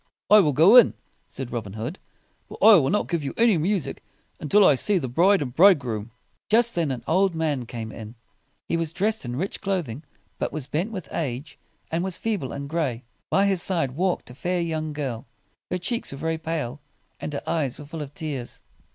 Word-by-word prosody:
"I 210 Hz, -, +10 dB
will 155 Hz, -7 st, +4 dB
go 170 Hz, -, +7 dB
in," 240 Hz, -, +7 dB, 0.3 s
said 130 Hz, -2 st, -7 dB
Robin 110 Hz, -5 st, -4 dB
Hood; 115 Hz, -, -5 dB, 0.5 s
"but -, -, -9 dB
I 225 Hz, -, +8 dB
will 135 Hz, -5 st, +2 dB
not 210 Hz, -, +1 dB
give 170 Hz, -4 st, -2 dB
you 140 Hz, -, -4 dB
any 230 Hz, -3 st, +5 dB
music 185 Hz, 0 st, -1 dB, 0.4 s
until 200 Hz, +7 st, +4 dB
I -, -, +7 dB
see 195 Hz, +9 st, +1 dB
the 140 Hz, -7 st, -2 dB
bride 175 Hz, +8 st, +3 dB
and 125 Hz, -2 st, -7 dB
bridegroom." 130 Hz, -, +4 dB, 0.4 s
Just 235 Hz, +2 st, +4 dB
then 165 Hz, -4 st, 0 dB
an 125 Hz, -3 st, -4 dB
old 185 Hz, +1 st, +2 dB
man 150 Hz, -7 st, -1 dB
came 115 Hz, -2 st, -6 dB
in. 110 Hz, +1 st, -9 dB, 0.5 s
He 170 Hz, -, 0 dB
was 165 Hz, -1 st, -3 dB
dressed 210 Hz, 0 st, -1 dB
in 120 Hz, 0 st, -4 dB
rich 185 Hz, +9 st, -3 dB
clothing, 170 Hz, -, -2 dB, 0.4 s
but -, -, -2 dB
was 150 Hz, -2 st, -4 dB
bent 170 Hz, +11 st, -2 dB
with 185 Hz, -7 st, -6 dB
age, 140 Hz, -1 st, -4 dB, 0.3 s
and 165 Hz, +2 st, 0 dB
was 190 Hz, -2 st, -1 dB
feeble 205 Hz, -, -2 dB
and 140 Hz, 0 st, -5 dB
gray. 140 Hz, -6 st, -2 dB, 0.3 s
By 195 Hz, -, +3 dB
his 195 Hz, -3 st, +1 dB
side 165 Hz, -9 st, -1 dB
walked 175 Hz, -1 st, -1 dB
a -, -, -10 dB
fair 175 Hz, +7 st, -2 dB
young 160 Hz, -2 st, -2 dB
girl. 135 Hz, -4 st, -4 dB, 0.4 s
Her 180 Hz, -, -1 dB
cheeks 205 Hz, +7 st, -3 dB
were 140 Hz, -, -7 dB
very 160 Hz, +2 st, -2 dB
pale, 155 Hz, -5 st, -3 dB, 0.4 s
and -, -, -5 dB
her 140 Hz, -, -4 dB
eyes 145 Hz, -7 st, -1 dB
were 150 Hz, -, -10 dB
full 160 Hz, +1 st, -7 dB
of 140 Hz, -2 st, -6 dB
tears. 145 Hz, -5 st, -6 dB
160 Hz, 205 wpm, -24 LUFS, 135-185 Hz, 0.5 s, I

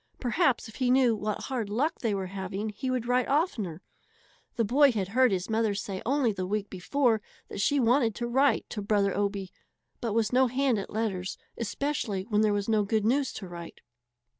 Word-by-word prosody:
Perhaps 255 Hz, 0 st, +1 dB
if 220 Hz, -, -12 dB
he 255 Hz, -2 st, +1 dB
knew 250 Hz, -3 st, +4 dB
what 210 Hz, 0 st, -3 dB
hard 245 Hz, -6 st, -3 dB
luck 275 Hz, +10 st, 0 dB
they 220 Hz, -4 st, 0 dB
were 190 Hz, -1 st, -2 dB
having 190 Hz, +2 st, -4 dB
he 235 Hz, +6 st, -4 dB
would 255 Hz, -2 st, -1 dB
write 250 Hz, 0 st, +2 dB
oftener. 225 Hz, -, -1 dB, 0.7 s
The 230 Hz, -, +1 dB
boy 275 Hz, +5 st, +5 dB
had 200 Hz, -5 st, -2 dB
heard 255 Hz, +2 st, +4 dB
his 185 Hz, -1 st, -1 dB
mother 220 Hz, -2 st, +1 dB
say 195 Hz, -1 st, -4 dB
only 270 Hz, -3 st, +2 dB
the 185 Hz, -2 st, -3 dB
week 210 Hz, +1 st, -2 dB
before 225 Hz, +4 st, +1 dB, 0.3 s
that -, -, -4 dB
she 285 Hz, +7 st, +2 dB
wanted 235 Hz, -2 st, +3 dB
to 240 Hz, -, -3 dB
write 270 Hz, +4 st, +2 dB
to 210 Hz, -, -3 dB
Brother 200 Hz, -1 st, +1 dB
Obie, 200 Hz, -2 st, -2 dB, 0.5 s
but 230 Hz, -3 st, -2 dB
was 225 Hz, 0 st, +1 dB
no 260 Hz, +1 st, +5 dB
hand 255 Hz, -2 st, +1 dB
at 195 Hz, -, -6 dB
letters, 195 Hz, -4 st, -2 dB, 0.2 s
especially 230 Hz, -4 st, -2 dB
when 210 Hz, -1 st, +3 dB
there 215 Hz, -1 st, +3 dB
was 205 Hz, -1 st, -1 dB
no 215 Hz, -2 st, +3 dB
good 210 Hz, +1 st, 0 dB
news 265 Hz, +3 st, +2 dB
to 195 Hz, -, -7 dB
write. 170 Hz, -1 st, -9 dB
220 Hz, 200 wpm, -28 LUFS, 200-255 Hz, 0.7 s, boy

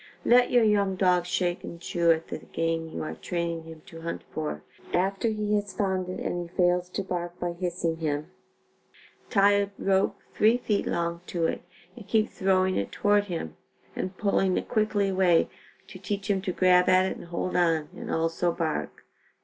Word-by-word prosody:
Let 245 Hz, +1 st, +5 dB
your 245 Hz, -2 st, +4 dB
young 200 Hz, -3 st, +2 dB
dog 180 Hz, -2 st, +2 dB
shake 175 Hz, -1 st, -1 dB
and 170 Hz, -, -8 dB
chew 170 Hz, 0 st, 0 dB
at 165 Hz, 0 st, +2 dB
the -, -, -4 dB
game 165 Hz, 0 st, -2 dB
you -, -, -5 dB
are 155 Hz, -, -4 dB
training 170 Hz, -2 st, -3 dB
him 160 Hz, -1 st, -11 dB
to 165 Hz, -1 st, -11 dB
hunt 170 Hz, +1 st, -5 dB
for. 155 Hz, -1 st, -4 dB, 0.3 s
After 195 Hz, +5 st, +1 dB
he 210 Hz, -1 st, -1 dB
has 205 Hz, -1 st, 0 dB
found 190 Hz, -2 st, -1 dB
it 185 Hz, -, -4 dB
and 175 Hz, -1 st, -3 dB
he -, -, -23 dB
fails 180 Hz, 0 st, +2 dB
to 200 Hz, -, -3 dB
bark 175 Hz, -1 st, -4 dB
by 175 Hz, 0 st, -1 dB
hissing 170 Hz, -2 st, -2 dB
him, 155 Hz, +1 st, -2 dB, 1.0 s
tie 200 Hz, -1 st, +5 dB
a 200 Hz, 0 st, +2 dB
rope 195 Hz, 0 st, +1 dB, 0.2 s
three 225 Hz, +3 st, +4 dB
feet 210 Hz, -4 st, -1 dB
long 170 Hz, 0 st, -1 dB
to 170 Hz, -2 st, -1 dB
it -, -, -1 dB, 0.3 s
and 215 Hz, -4 st, -12 dB
keep 220 Hz, +1 st, +2 dB
throwing 190 Hz, -1 st, +2 dB
it 100 Hz, -, -2 dB
toward 205 Hz, 0 st, +2 dB
him 165 Hz, -, -5 dB, 0.4 s
and 185 Hz, 0 st, -4 dB
pulling 195 Hz, -2 st, +2 dB
it -, -, -3 dB
quickly 215 Hz, -3 st, +1 dB
away 185 Hz, -3 st, +3 dB, 0.4 s
to -, -, -10 dB
teach 205 Hz, 0 st, -2 dB
him 195 Hz, -1 st, +1 dB
to 190 Hz, -1 st, -2 dB
grab 180 Hz, 0 st, +4 dB
at 185 Hz, 0 st, +5 dB
it 190 Hz, -, -2 dB
and -, -, -10 dB
hold 175 Hz, +1 st, -3 dB
on, 165 Hz, -4 st, +2 dB
and -, -, -7 dB
also 165 Hz, +2 st, 0 dB
bark. 160 Hz, -2 st, -3 dB
180 Hz, 190 wpm, -27 LUFS, 170-200 Hz, 1.0 s, Let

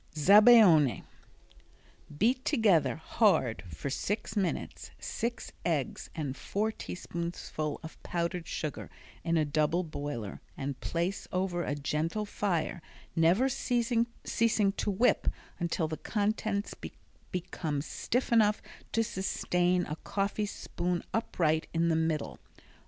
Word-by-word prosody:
Zabaione 195 Hz, -, +7 dB, 1.1 s
Beat 250 Hz, -, +2 dB
together, 215 Hz, -, +3 dB
hard, 160 Hz, -, +2 dB
for 85 Hz, -, -5 dB
six 210 Hz, +11 st, -2 dB
minutes, 195 Hz, -4 st, -2 dB
six 235 Hz, +1 st, -4 dB
eggs 155 Hz, -6 st, -1 dB
and 145 Hz, -5 st, -3 dB
four 215 Hz, +8 st, -1 dB
teaspoonfuls 170 Hz, -6 st, -4 dB
of 160 Hz, -, -10 dB
powdered 170 Hz, 0 st, -2 dB
sugar 150 Hz, -3 st, -4 dB, 0.3 s
in 165 Hz, 0 st, +1 dB
a 155 Hz, -, +3 dB
double 155 Hz, +4 st, +1 dB
boiler 145 Hz, -, -5 dB, 0.2 s
and 135 Hz, -1 st, -4 dB
place 175 Hz, +3 st, -2 dB
over 180 Hz, -1 st, 0 dB
a 145 Hz, -, -2 dB
gentle 155 Hz, +8 st, -1 dB
fire, 180 Hz, -4 st, -1 dB, 0.3 s
never 175 Hz, +10 st, +4 dB
ceasing 240 Hz, -2 st, +1 dB, 0.2 s
to 210 Hz, -3 st, +2 dB
whip 215 Hz, +6 st, +2 dB, 0.3 s
until 170 Hz, -1 st, 0 dB
the 155 Hz, 0 st, -4 dB
contents 210 Hz, -1 st, -1 dB, 0.6 s
become 165 Hz, -5 st, -3 dB
stiff 245 Hz, +10 st, -2 dB
enough 215 Hz, -2 st, +4 dB, 0.3 s
to 225 Hz, -, +3 dB
sustain 180 Hz, -3 st, 0 dB
a 150 Hz, -, -5 dB
coffee 200 Hz, +3 st, -1 dB
spoon 175 Hz, -3 st, -3 dB
upright 160 Hz, -8 st, +1 dB
in 170 Hz, +1 st, +3 dB
the 165 Hz, -, +3 dB
middle. 160 Hz, -2 st, -1 dB
175 Hz, 115 wpm, -30 LUFS, 155-210 Hz, 1.1 s, Zabaione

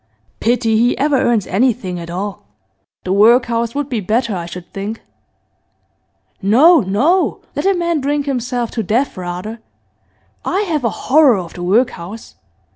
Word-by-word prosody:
Pity 230 Hz, -1 st, +1 dB
he 240 Hz, +2 st, +2 dB
ever 290 Hz, +1 st, +1 dB
earns 235 Hz, -5 st, +1 dB
anything 205 Hz, -4 st, 0 dB
at 170 Hz, 0 st, -8 dB
all. 190 Hz, -, -5 dB, 0.6 s
The 185 Hz, -, -1 dB
workhouse 230 Hz, +2 st, +3 dB
would 290 Hz, -1 st, -2 dB
be 245 Hz, -5 st, -2 dB
better, 220 Hz, +2 st, -1 dB
I 170 Hz, -1 st, -5 dB
should 175 Hz, 0 st, -10 dB
think.' 205 Hz, +3 st, -5 dB, 1.4 s
'No, 280 Hz, -, +6 dB
no! 265 Hz, -, +1 dB
Let -, -, -1 dB
a 390 Hz, -, +3 dB
man 340 Hz, -3 st, 0 dB
drink 285 Hz, +1 st, -1 dB
himself 245 Hz, -3 st, -2 dB
to 230 Hz, -, -2 dB
death 235 Hz, +7 st, 0 dB
rather. 185 Hz, +5 st, -6 dB, 0.8 s
I 380 Hz, +3 st, 0 dB
have 320 Hz, -9 st, -1 dB
a 230 Hz, -, +2 dB
horror 275 Hz, -1 st, +3 dB
of 175 Hz, -3 st, -6 dB
the 175 Hz, -, -8 dB
workhouse. 200 Hz, +1 st, -1 dB
230 Hz, 150 wpm, -17 LUFS, 195-270 Hz, 1.4 s, No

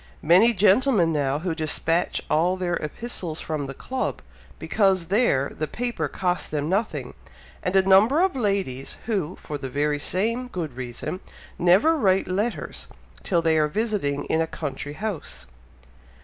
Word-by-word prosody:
Many 185 Hz, +9 st, +6 dB
gentlemen 200 Hz, -3 st, +4 dB
now, 140 Hz, -2 st, 0 dB
who 170 Hz, +2 st, -2 dB
despatch 160 Hz, +1 st, 0 dB
all 175 Hz, +4 st, +2 dB
their 180 Hz, -1 st, -1 dB
epistles 170 Hz, -1 st, -5 dB
from 150 Hz, -3 st, -3 dB
the 135 Hz, -, -7 dB
club, 260 Hz, 0 st, -3 dB, 0.3 s
because 190 Hz, -5 st, +1 dB
there 185 Hz, -, +2 dB
the 155 Hz, -, -2 dB
paper 240 Hz, +8 st, -2 dB
costs 180 Hz, -1 st, -1 dB
them 150 Hz, -1 st, -2 dB
nothing, 200 Hz, +6 st, -1 dB, 0.5 s
and 180 Hz, -, -2 dB
a 190 Hz, -, +6 dB
number 200 Hz, +10 st, +5 dB
of 375 Hz, -2 st, +2 dB
ladies, 195 Hz, -, -2 dB
who, 190 Hz, -7 st, -1 dB
for 145 Hz, -1 st, -7 dB
the 145 Hz, +2 st, -1 dB
same 230 Hz, +10 st, -1 dB
good 165 Hz, -, -5 dB
reason, 125 Hz, +8 st, -5 dB, 0.4 s
never 190 Hz, -, +5 dB
write 195 Hz, -9 st, +2 dB
letters 205 Hz, +6 st, -2 dB, 0.3 s
till 170 Hz, -4 st, 0 dB
they 160 Hz, -1 st, +3 dB
are 150 Hz, -, +3 dB
visiting 200 Hz, -7 st, -1 dB
in 160 Hz, -, +1 dB
a 165 Hz, -, 0 dB
country 145 Hz, -2 st, -5 dB
house." 155 Hz, -, -5 dB
180 Hz, 150 wpm, -24 LUFS, 150-210 Hz, 0.5 s, Many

